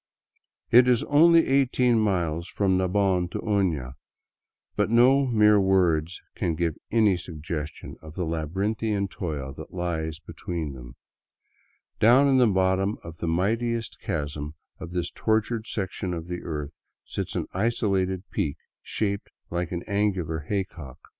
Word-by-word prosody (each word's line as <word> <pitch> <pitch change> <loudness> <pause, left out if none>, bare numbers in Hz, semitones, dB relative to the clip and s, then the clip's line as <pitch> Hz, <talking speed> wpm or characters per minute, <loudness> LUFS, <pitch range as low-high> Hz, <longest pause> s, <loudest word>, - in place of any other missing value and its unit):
It 125 +1 +7
is 125 -2 +3
only 165 +3 +5
eighteen 125 -3 +3
miles 85 -5 0
from 95 -2 +1
Nabon 95 -1 +1
to - - -4
Oiia, 90 - 0 0.8
but - - +1
no 130 +4 +5
mere 105 -3 +5
words 90 -4 +2
can 85 -2 -1
give 85 -1 -1
any 110 -4 +4
suggestion 80 -3 -6
of 80 0 -11
the 90 - -2
labyrinthian 100 +6 -1
toil 75 -8 -5
that 80 +4 -10
lies 80 -3 -2
between 80 -2 -5
them. 60 -1 -11 1.0
Down 125 +6 +6
in 135 -1 +4
the 125 - +6
bottom 95 +1 +1
of 85 0 -9
the 85 - -4
mightiest 115 +7 -1
chasm 75 -5 -4 0.2
of 90 - -7
this 90 -1 -2
tortured 110 0 0
section 95 -2 -3
of 80 -1 -6
the 90 0 -5
earth 75 -2 -6 0.3
sits - - -5
an - - -1
isolated 95 -3 0
peak 75 - -1 0.2
shaped 100 -2 -2 0.2
like 85 0 -2
art' 85 -1 -3
angular 95 -6 0
hay 100 -2 +1
cock. 75 -9 -13
95 Hz, 140 wpm, -26 LUFS, 80-110 Hz, 1.0 s, It